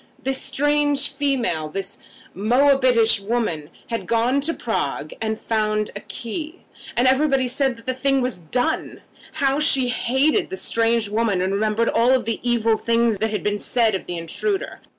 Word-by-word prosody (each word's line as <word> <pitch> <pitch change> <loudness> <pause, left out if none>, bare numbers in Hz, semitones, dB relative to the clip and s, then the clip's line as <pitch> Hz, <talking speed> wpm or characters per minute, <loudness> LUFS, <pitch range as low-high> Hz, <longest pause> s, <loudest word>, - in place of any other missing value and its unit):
This 265 0 -1
strange 290 +1 +1
female, 260 - -1
this 195 +4 -5 0.3
Moabitish 245 0 +3
woman, 200 -8 -2 0.2
had 230 - -3
gone 240 +4 +2
to 310 +4 0
Prague, 155 - -3
and 220 -1 -1
had - - -25
found 215 -1 0
a - - -3
key, 305 - -6 0.4
and 245 +2 +4
everybody 265 -1 +3
said 265 0 0
that 230 - -16
the 255 - -1
thing 275 +1 +1
was 250 -6 -1
done! 245 +10 -2 0.3
How 275 0 +1
she 270 -4 +2
hated 265 - +1
the 380 - -5
strange 230 - +1
woman, 210 -2 0
and 190 +2 0
remembered 215 +3 +1
all 250 +3 +3
the 230 -2 -2
evil 230 -2 +2
things 230 -2 +1
that 220 - 0
had 210 - -3
been 205 0 -1
said 230 -1 +2
of 190 - -4
the 175 - -3
intruder! 385 - -3
235 Hz, 170 wpm, -22 LUFS, 215-270 Hz, 0.4 s, and